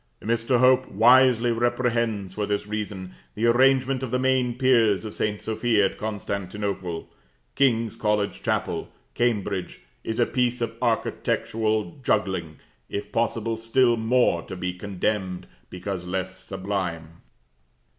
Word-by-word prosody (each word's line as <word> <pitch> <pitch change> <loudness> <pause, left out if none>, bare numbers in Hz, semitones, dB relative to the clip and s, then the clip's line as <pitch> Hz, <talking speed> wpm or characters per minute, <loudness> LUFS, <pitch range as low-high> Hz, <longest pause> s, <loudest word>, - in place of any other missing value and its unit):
Mr. 115 +3 +1
Hope 130 +1 +4
wisely 120 +2 +5
reprehends, 115 -4 0
for 105 +1 -2
this 105 0 -1
reason, 105 -3 -5 0.2
the 110 - 0
arrangement 130 +2 +3
of 130 - -3
the 125 - 0
main 130 -2 +1
piers 115 -6 +3
of 110 - -6
St. 105 -1 -1
Sophia 110 -1 +1
at 95 - -3
Constantinople. 100 -4 -4 0.5
King's 115 -5 +2
College 105 -2 -1
Chapel, - - -2 0.2
Cambridge, 105 -6 -1 0.2
is 110 +1 -3
a 120 - +5
piece 125 0 0
of 115 -1 -3
architectural 110 -3 -1
juggling, 95 -8 0 0.3
if 100 - -5
possible 115 -1 -1
still 120 +2 +3
more 115 -5 +2
to 95 - -8
be 90 0 -3
condemned, 95 0 -2 0.2
because 90 0 -5
less 95 +1 -3
sublime. 95 -4 -5
110 Hz, 125 wpm, -25 LUFS, 95-120 Hz, 0.5 s, wisely